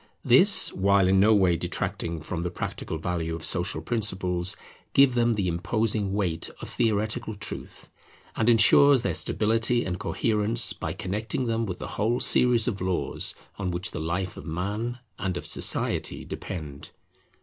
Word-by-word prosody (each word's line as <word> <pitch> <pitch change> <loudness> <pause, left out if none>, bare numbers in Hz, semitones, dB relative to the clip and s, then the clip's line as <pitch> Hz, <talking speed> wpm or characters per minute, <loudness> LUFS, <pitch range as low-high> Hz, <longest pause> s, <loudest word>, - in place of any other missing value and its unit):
This, - - +5
while 100 0 +3
in 95 +1 +3
no 110 +3 +5
way 95 -4 +3
detracting 85 -1 -3
from 85 +1 -4
the 90 - -2
practical 80 -2 -5
value 80 0 -3
of 80 - -5
social 90 +1 0
principles, 95 -4 -1 0.4
give 135 -2 +5
them 120 -1 +2
the 100 -3 -1
imposing 105 +4 -1
weight 90 -5 -2
of - - -8
theoretical 110 +1 -1
truth; 105 - -7 0.5
and 115 +1 +1
ensures 125 +3 +6
their - - -1
stability 115 +2 0
and 90 -1 -4
coherence, 110 +1 +1
by - - -5
connecting 110 +6 -3
them 115 -1 -1
with 90 -2 -5
the - - -7 0.2
whole 115 +3 +1
series 120 -3 +4
of 100 -6 -3
laws 90 -1 -1 0.2
on 95 -2 -2
which 90 +1 -3
the - - -5
life 90 +3 -3
of - - -9
man 105 +9 -3 0.2
and 95 -1 -2
of - - -7
society - - 0
depend. 75 -6 -7
100 Hz, 160 wpm, -26 LUFS, 90-115 Hz, 0.5 s, ensures